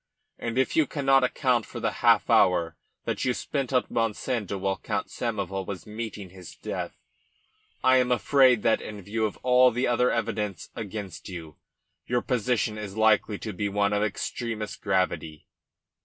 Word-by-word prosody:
And 115 Hz, +1 st, -3 dB
if 130 Hz, -, +1 dB
you 155 Hz, -3 st, +4 dB
cannot 135 Hz, -2 st, +3 dB
account 125 Hz, -2 st, +2 dB
for -, -, -7 dB
the -, -, 0 dB
half -, -, +5 dB
hour 85 Hz, -3 st, +3 dB, 0.3 s
that -, -, -2 dB
you 125 Hz, -1 st, +1 dB
spent 140 Hz, -3 st, -3 dB
at 130 Hz, -1 st, +1 dB
Monsanto 115 Hz, -2 st, -1 dB
while 95 Hz, -1 st, -1 dB
Count -, -, -3 dB
Samoval 95 Hz, -5 st, -3 dB
was 95 Hz, -3 st, -6 dB
meeting 105 Hz, -3 st, -6 dB
his 90 Hz, -2 st, -11 dB
death, -, -, -5 dB, 0.9 s
I 130 Hz, 0 st, +6 dB
am 125 Hz, -1 st, +2 dB
afraid 125 Hz, -1 st, +4 dB
that, 115 Hz, -, +3 dB
in 105 Hz, -2 st, -8 dB
view 110 Hz, +3 st, -1 dB
of 105 Hz, -, -9 dB
all 125 Hz, 0 st, +6 dB
the 125 Hz, +2 st, -1 dB
other 125 Hz, +1 st, +3 dB
evidences 105 Hz, -5 st, -2 dB
against 105 Hz, -5 st, -6 dB
you, 80 Hz, -4 st, -8 dB, 0.5 s
your 120 Hz, 0 st, 0 dB
position 115 Hz, -3 st, 0 dB
is 100 Hz, -1 st, -7 dB
likely 110 Hz, -1 st, +3 dB
to 110 Hz, -, -6 dB
be 100 Hz, +2 st, -2 dB
one 100 Hz, +1 st, +1 dB
of 105 Hz, -, +1 dB
extremest 110 Hz, +1 st, -3 dB
gravity. 95 Hz, -6 st, -1 dB
110 Hz, 165 wpm, -27 LUFS, 100-125 Hz, 0.9 s, I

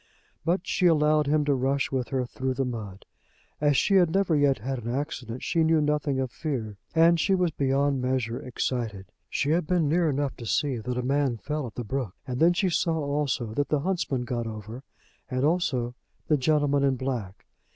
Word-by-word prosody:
But 175 Hz, +3 st, 0 dB
she 180 Hz, -, +2 dB
allowed 150 Hz, -2 st, +3 dB
him 150 Hz, 0 st, +2 dB
to 145 Hz, -, +3 dB
rush 135 Hz, +1 st, 0 dB
with 130 Hz, -2 st, -1 dB
her 130 Hz, -2 st, -1 dB
through 130 Hz, +1 st, -3 dB
the 135 Hz, +1 st, 0 dB
mud. 105 Hz, -6 st, -6 dB, 0.6 s
As 145 Hz, -2 st, +3 dB
she 195 Hz, +6 st, +4 dB
had 175 Hz, -3 st, +5 dB
never 185 Hz, -1 st, +2 dB
yet 145 Hz, -3 st, +3 dB
had 125 Hz, +3 st, -4 dB
an 115 Hz, -, -4 dB
accident 130 Hz, -3 st, -4 dB
she 165 Hz, -, +1 dB
knew 160 Hz, 0 st, +4 dB
nothing 150 Hz, -2 st, 0 dB
of 130 Hz, -2 st, -2 dB
fear, 115 Hz, -10 st, -4 dB, 0.2 s
and 165 Hz, +1 st, +5 dB
she 190 Hz, +5 st, +3 dB
was 180 Hz, -3 st, +1 dB
beyond 140 Hz, -1 st, +1 dB
measure 125 Hz, -2 st, -1 dB
excited. 115 Hz, -6 st, -3 dB, 0.2 s
She 145 Hz, -, 0 dB
had 165 Hz, -1 st, +1 dB
been 175 Hz, -4 st, +2 dB
near 165 Hz, +2 st, +2 dB
enough 140 Hz, -2 st, -1 dB
to 120 Hz, -, -8 dB
see 140 Hz, -1 st, +1 dB
that 120 Hz, +3 st, -4 dB
a 125 Hz, -, -1 dB
man 135 Hz, -2 st, +1 dB
fell 150 Hz, +6 st, -3 dB
at 110 Hz, -, -11 dB
the 120 Hz, -, -3 dB
brook, 115 Hz, -3 st, -3 dB
and 125 Hz, -1 st, -4 dB
then 170 Hz, +2 st, +5 dB
she 190 Hz, +2 st, +1 dB
saw 165 Hz, 0 st, +1 dB
also 140 Hz, -6 st, -1 dB
that 145 Hz, +4 st, -1 dB
the 150 Hz, -2 st, +1 dB
huntsman 165 Hz, -7 st, -1 dB
got 120 Hz, -2 st, -3 dB
over, 110 Hz, +3 st, -7 dB, 0.5 s
and 130 Hz, +1 st, 0 dB
also 145 Hz, -8 st, 0 dB, 0.3 s
the 155 Hz, -, +4 dB
gentleman 145 Hz, 0 st, +2 dB
in 135 Hz, -1 st, +3 dB
black. 120 Hz, -7 st, -4 dB
140 Hz, 205 wpm, -27 LUFS, 125-155 Hz, 0.6 s, had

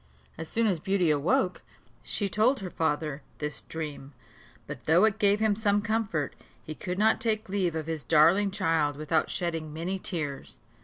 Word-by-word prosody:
As 160 Hz, 0 st, -7 dB
soon 230 Hz, 0 st, +1 dB
as 190 Hz, -6 st, +1 dB
Beauty 185 Hz, -1 st, +1 dB
awoke, 165 Hz, +5 st, +1 dB, 0.4 s
she 205 Hz, -, -2 dB
told 220 Hz, +8 st, +2 dB
her 185 Hz, -2 st, -5 dB
father 150 Hz, -2 st, -1 dB, 0.2 s
this 150 Hz, 0 st, -4 dB
dream; 150 Hz, -3 st, -7 dB, 0.5 s
but -, -, -8 dB
though 170 Hz, +6 st, +5 dB
it 220 Hz, -2 st, 0 dB
gave 205 Hz, 0 st, +4 dB
him 220 Hz, -2 st, +2 dB
some 205 Hz, -1 st, +2 dB
comfort, 210 Hz, -10 st, -1 dB, 0.3 s
he 155 Hz, -, -6 dB
could 180 Hz, +3 st, -5 dB
not 220 Hz, +2 st, +3 dB
take 220 Hz, -2 st, 0 dB
leave 185 Hz, -4 st, 0 dB
of 160 Hz, -1 st, -3 dB
his 160 Hz, -2 st, -4 dB
darling 165 Hz, +6 st, +4 dB
child 165 Hz, -7 st, +1 dB
without 155 Hz, +2 st, 0 dB
shedding 165 Hz, -3 st, -3 dB
many 175 Hz, +5 st, -3 dB
tears. 155 Hz, -7 st, -5 dB
175 Hz, 170 wpm, -28 LUFS, 155-205 Hz, 0.5 s, though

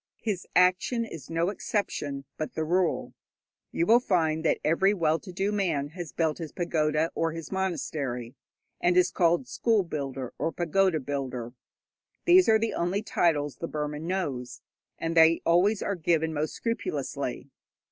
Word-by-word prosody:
His 205 Hz, -5 st, -2 dB
action 185 Hz, +6 st, +3 dB
is 165 Hz, -9 st, -9 dB
no 165 Hz, +2 st, +1 dB
exception, 145 Hz, -9 st, -3 dB
but 155 Hz, -, -5 dB
the 160 Hz, -, -1 dB
rule. 175 Hz, +2 st, 0 dB, 0.6 s
You 170 Hz, -, 0 dB
will 230 Hz, +5 st, +6 dB
find 160 Hz, -8 st, +1 dB
that 160 Hz, -, +2 dB
every 190 Hz, +6 st, +3 dB
well 160 Hz, -3 st, +1 dB
to 185 Hz, -, -10 dB
do 195 Hz, +3 st, -1 dB
man 165 Hz, -9 st, 0 dB
has 170 Hz, 0 st, -7 dB
built 160 Hz, -1 st, 0 dB
his 160 Hz, -3 st, -6 dB
pagoda 155 Hz, -2 st, 0 dB
or 165 Hz, -1 st, -1 dB
his 165 Hz, -1 st, -7 dB
monastery, 145 Hz, -10 st, -3 dB, 0.5 s
and 175 Hz, 0 st, +2 dB
is 180 Hz, -, +4 dB
called 175 Hz, +6 st, +2 dB
'school 225 Hz, -5 st, +1 dB
builder' 135 Hz, -6 st, -5 dB
or 165 Hz, -, 0 dB
'pagoda 175 Hz, 0 st, +1 dB
builder.' 130 Hz, -4 st, -4 dB, 0.7 s
These 360 Hz, +1 st, +6 dB
are 220 Hz, -, +6 dB
the 225 Hz, +1 st, -1 dB
only 185 Hz, +5 st, -1 dB
titles 150 Hz, -8 st, +1 dB
the 165 Hz, -, -4 dB
Burman 150 Hz, +1 st, -4 dB
knows, 145 Hz, -10 st, -3 dB, 0.3 s
and 165 Hz, 0 st, -3 dB
they 165 Hz, 0 st, +5 dB
always 190 Hz, +5 st, +3 dB
are 200 Hz, -, -1 dB
given 160 Hz, -2 st, +1 dB
most 155 Hz, +1 st, -2 dB
scrupulously. 235 Hz, +11 st, -3 dB
165 Hz, 155 wpm, -27 LUFS, 155-190 Hz, 0.7 s, will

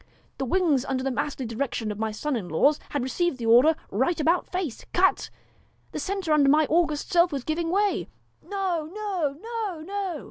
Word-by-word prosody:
'The 270 Hz, -, -1 dB
wings 300 Hz, -3 st, +2 dB
under 260 Hz, -1 st, -2 dB
the 270 Hz, -, 0 dB
masterly 265 Hz, 0 st, -2 dB
direction 230 Hz, -1 st, -3 dB
of 210 Hz, -, -7 dB
my 220 Hz, 0 st, 0 dB
sons 280 Hz, +7 st, -2 dB
in 195 Hz, -7 st, -4 dB
law, 160 Hz, -, +4 dB, 0.2 s
had 285 Hz, -3 st, -2 dB
received 320 Hz, +3 st, -1 dB
the 235 Hz, -, -5 dB
order 245 Hz, +8 st, +6 dB
" -, -, -33 dB, 0.2 s
Right 345 Hz, -1 st, -1 dB
about 335 Hz, +4 st, +2 dB
face, 360 Hz, -10 st, -3 dB
cut! 380 Hz, +2 st, +2 dB, 0.3 s
" -, -, -37 dB
the -, -, -4 dB
centre 385 Hz, -5 st, -1 dB
under 285 Hz, -2 st, +5 dB
my 305 Hz, +2 st, +5 dB
august 315 Hz, 0 st, +1 dB
self 345 Hz, 0 st, +5 dB
was 275 Hz, -3 st, -3 dB
giving 330 Hz, +3 st, -2 dB
way.' 400 Hz, +3 st, +1 dB, 0.3 s
'No, 365 Hz, -6 st, -2 dB
no!' 375 Hz, -9 st, -2 dB
'No, 440 Hz, -6 st, -4 dB
no!' 380 Hz, -2 st, -4 dB
310 Hz, 200 wpm, -26 LUFS, 265-365 Hz, 0.3 s, order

